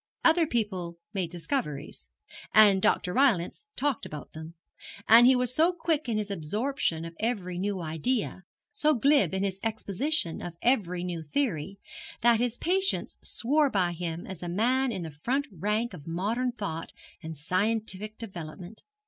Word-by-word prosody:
Other 330 0 +5
people 190 - -2 0.2
made 185 -4 -1
discoveries, 165 - -4 0.5
and 205 -3 +7
Dr. 180 - +2
Rylance 260 - +2
talked 280 -3 0
about 150 -1 -8
them; 160 +1 -9 0.5
and 235 +2 +9
he 260 - +6
was 250 -1 0
so 325 +6 +4
quick 325 -5 -1
in 220 - 0
his 210 -1 -3
absorption 195 - -1
of 165 - -7
every 195 -6 -2
new 200 0 -1
idea, 190 +6 -2 0.3
so 300 +1 +2
glib 280 +4 +4
in 190 0 -1
his 195 -1 -2
exposition 220 - 0
of 175 -1 -6
every 185 -8 +1
new 175 -2 -3
theory, 190 - -2 0.4
that 235 -1 +5
his 245 0 0
patients 380 +3 +1
swore 290 +4 +1
by 185 -6 +1
him 170 0 -4
as 190 -3 -8
a 175 - -4
man 250 +8 +1
in 190 -5 -4
the 160 - -6
front 250 - -1
rank 210 +6 -1
of 145 - -10
modern 215 +9 -1
thought 195 -9 -5 0.3
and 160 -1 -7
scientific 210 +5 -1
development. 180 -1 -8
205 Hz, 155 wpm, -28 LUFS, 175-250 Hz, 0.5 s, and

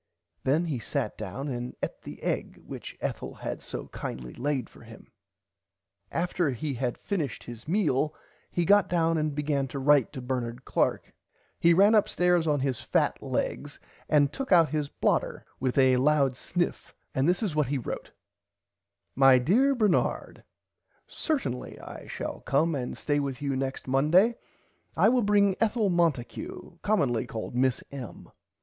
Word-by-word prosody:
Then 150 +6 +2
he 145 -7 -2
sat 105 -1 -2
down 110 +7 -5
and 125 -1 -4
eat - - -11
the - - -10
egg - - -2
which - - -8
Ethel - - -4
had - - -5
so - - -6
kindly 60 -1 -6
laid 135 -2 -2
for - - -18
him. - - -14 1.0
After 175 -1 0
he 135 +3 -3
had 125 -1 -2
finished 160 - -3
his 120 +3 -10
meal 155 -5 +1 0.3
he 175 - 0
got 205 +2 +5
down 165 -2 +2
and 155 -2 -1
began 145 -2 0
to 135 - -6
write 140 -1 +4
to 135 - -5
Bernard 125 -1 -3
Clark - - 0 0.5
he 170 0 +5
ran 200 +4 +6
up 210 -2 +4
stairs 180 -2 +2
on 145 -3 +2
his 130 -3 -1
fat - - 0
legs - - -3 0.3
and 145 -2 +4
took 270 -4 -5
out 170 -4 +6
his 150 -2 -1
blotter - - 0
with 130 0 -1
a 130 -1 +5
loud 140 -1 +3
sniff 175 +7 -3 0.2
and 135 +5 +2
this 180 +5 +1
is 185 -8 -1
what 150 -3 +2
he 140 +2 0
wrote 125 - -5 1.0
My 135 -1 +6
dear 240 - +3
Bernard 210 -7 0 0.6
Certinly 250 - -3
I - - -10
shall - - -5
come 155 +4 +1
and 125 -4 -3
stay 145 -1 0
with 140 -2 -3
you 140 -2 -1
next 135 0 -3
Monday 155 - +4 0.6
I 215 - +6
will 250 +1 +3
bring 200 -2 +3
Ethel 220 -3 +2
Monticue 160 -9 -2
commonly 135 - +1
called 110 +1 -5
Miss 130 0 +1
M. 135 -5 -9
145 Hz, 160 wpm, -28 LUFS, 130-175 Hz, 1.0 s, ran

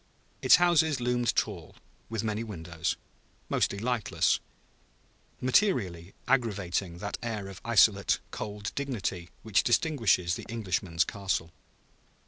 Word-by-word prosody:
Its - - +8
houses 160 -5 +3
loomed 120 -1 +1
tall, - - -2 0.3
with 115 -2 -2
many 110 0 -1
windows, 85 -6 -3 0.5
mostly 100 - +1
lightless 115 0 +1 1.0
materially 105 - +1
aggravating 100 -8 0
that 100 +3 -5
air 110 -4 -4
of 95 -1 -10
isolate, 105 -3 +4
cold 105 -1 -5
dignity 105 -10 -3
which 110 -3 +3
distinguishes 115 - +2
the - - -5
Englishman's 95 -6 0
castle. 95 -4 -2
105 Hz, 110 wpm, -29 LUFS, 95-120 Hz, 1.0 s, Its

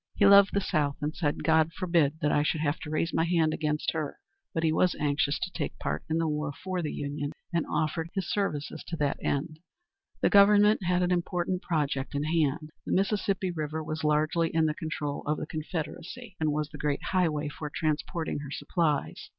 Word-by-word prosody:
He 200 - +4
loved 200 0 +7
the 200 - +3
South, 150 -7 0
and 150 +2 -3
said, 145 -4 -1
"God 160 0 +3
forbid 165 -4 +1
that 150 - +2
I 145 - +3
should 155 +1 0
have 145 -1 0
to 150 - -7
raise 160 +2 -1
my - - +2
hand 165 -2 +2
against 150 -1 -1
her"; 155 -3 -3 0.3
but 165 - -2
he 160 -1 +3
was 180 +2 +3
anxious 145 0 +1
to 180 - -4
take 160 - -4
part - - -3
in 160 - +1
the 165 -1 +1
war 150 -1 -1
for 185 +4 -4
the 150 - -2
Union, 145 +1 -4 0.2
and 170 -2 0
offered 155 +2 -1
his 190 -2 -1
services 155 -8 -2
to 170 - -3
that 145 -2 0
end. 155 +2 -2 0.6
The - - +3
Government 205 +1 +6
had 180 0 +2
an 180 - +1
important 180 +1 0
project 145 -5 -1
in 140 - 0
hand. 155 -1 0
The - - -2
Mississippi 195 -1 +1
River 155 -1 -3
was 155 +1 -4
largely 155 +2 +2
in 160 0 +2
the 155 - +1
control 150 -2 -4
of 150 +1 +1
the - - -4
Confederacy, 170 +7 -6
and 155 -1 +1
was 150 0 -1
the - - -10
great 145 -1 -1
highway 155 -5 +1
for 150 +1 -6
transporting 155 +1 -2
her 145 -1 -7
supplies. 150 0 -1
155 Hz, 205 wpm, -28 LUFS, 150-175 Hz, 0.6 s, loved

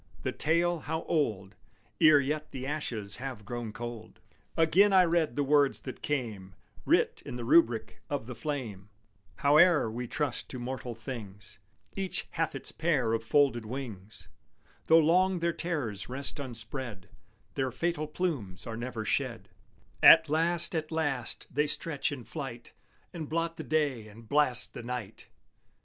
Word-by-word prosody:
The - - -1
tale, 170 +2 +2
how 160 +2 -3
old 105 - -1 0.5
Ere 155 -2 +8
yet 150 +2 -2
the 130 -1 -6
ashes 115 -9 -4
have 125 -5 -6
grown 120 0 -5
cold! 120 -1 -8 0.4
Again 180 +6 +5
I 185 -1 +7
read 165 -6 +1
the 145 - +1
words 145 0 +3
that 130 - -8
came 110 -10 -3 0.3
Writ - - +2
in - - -7
the 120 -1 -5
rubric 120 -5 +3
of 145 -5 -2
the 125 - -6
flame: 115 -7 -5 0.5
Howe'er 150 -3 +5
we 120 +2 -4
trust 140 -1 -3
to 130 - -6
mortal 125 -1 -5
things, 110 -5 -9 0.4
Each 190 -1 -2
hath 165 -1 -1
its - - -6
pair 150 -9 +1
of 115 0 -1
folded 135 -1 +3
wings; 110 -4 -8 0.6
Though 160 - +7
long 180 +4 +4
their 170 0 0
terrors 150 - -3
rest 140 +3 -3
unspread 115 -5 -6 0.5
Their 130 -1 -1
fatal 155 +4 -2
plumes 140 - -3
are 115 -2 -5
never 120 -2 -4
shed; - - -2 0.5
At 160 0 +9
last, 165 +2 +2
at 160 -1 -2
last, 145 -7 -2
they 150 +3 +1
stretch 150 0 -1
in 135 -4 -6
flight, 130 -4 -7 0.4
And 160 -4 -6
blot 165 +1 -1
the - - -5
day 145 -8 0
and 110 +2 -14
blast 140 -2 +2
the - - -7
night! 120 -3 -6
135 Hz, 155 wpm, -30 LUFS, 115-160 Hz, 0.6 s, At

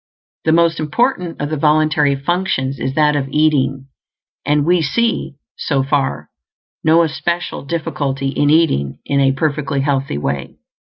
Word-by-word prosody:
The 160 - +3
most 165 0 +3
important 180 - -1
of 145 +1 -3
the 155 - -1
voluntary 150 -1 +2
functions 140 -3 -1
is 130 - -3
that 150 -1 +3
of 140 -2 -1
eating; 140 -3 +1 0.6
and 150 0 +1
we 175 +1 +3
see, 230 +1 -1 0.2
so 140 -3 -1
far, 135 - -1 0.5
no 160 +2 +5
especial 170 +3 -2
difficulty 140 -3 -2
in 145 +1 +1
eating 145 - +2
in 140 - 0
a 135 -1 +4
perfectly 145 -1 -1
healthy 135 - -1
way. 70 -2 -3
145 Hz, 140 wpm, -17 LUFS, 135-160 Hz, 0.6 s, no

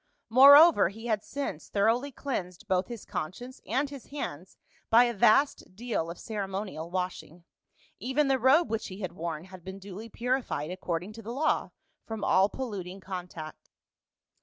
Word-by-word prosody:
Moreover 280 - +8
he 225 +4 -11
had 215 -3 0
since 275 - -5
thoroughly 230 +7 +1
cleansed 215 -8 -5
both 185 -2 +1
his 235 -3 -8
conscience 245 +11 -6
and 265 +6 0
his 275 -3 -10
hands 190 - -6 0.3
by 230 +2 +7
a 240 -1 0
vast 215 -1 +3
deal 220 -7 -2
of 170 - -7
ceremonial 195 -5 -5
washing; 180 -2 -4 0.6
even 265 +6 +1
the 270 -1 +2
robe 270 +6 +4
which 225 - -2
he 190 +1 -9
had 185 -3 -3
worn 165 -2 -5
had 185 -1 -13
been 190 +2 -7
duly 200 +3 -9
purified, 240 - -2
according 180 +1 -4
to 225 - -10
the 225 +2 -7
law, 280 +6 0 0.4
from 220 -2 -5
all 190 +2 +4
polluting 195 -7 -6
contact. 180 -5 -8
205 Hz, 160 wpm, -29 LUFS, 180-245 Hz, 0.6 s, Moreover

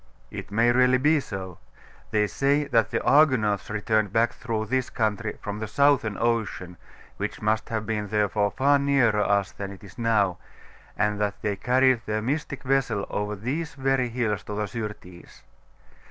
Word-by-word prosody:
'It 100 -1 -7
may 115 +4 +3
really 125 +1 +4
be 150 +4 +3
so. 95 -8 -7 0.5
They 105 -1 +2
say 140 +6 +1
that 115 -6 +2
the 115 - -2
Argonauts 125 -10 +3
returned 110 -1 0
back 115 +2 +2
through 110 -2 -3
this 130 +2 -1
country 110 -1 -2
from 105 0 -4
the 110 - -4
Southern 130 -4 +2
Ocean, 110 -6 -1 0.4
which - - -4
must 110 +1 0
have 110 -1 -2
been 105 -1 -2
therefore 105 0 +1
far 140 +5 +3
nearer 135 -7 +3
us 100 -1 +1
than 100 -1 -6
it 100 - -12
is 100 +3 -13
now, 105 -6 +1 0.6
and 105 0 0
that 105 0 -1
they 105 -1 0
carried 130 +3 +3
their 110 0 -1
mystic 145 +2 -3
vessel 130 -6 0
over 105 0 -2
these 135 +10 -4
very 135 -2 +1
hills 115 -4 -1
to 105 - -5
the 105 0 -1
Syrtis. 105 -5 -8
110 Hz, 170 wpm, -25 LUFS, 105-130 Hz, 0.6 s, really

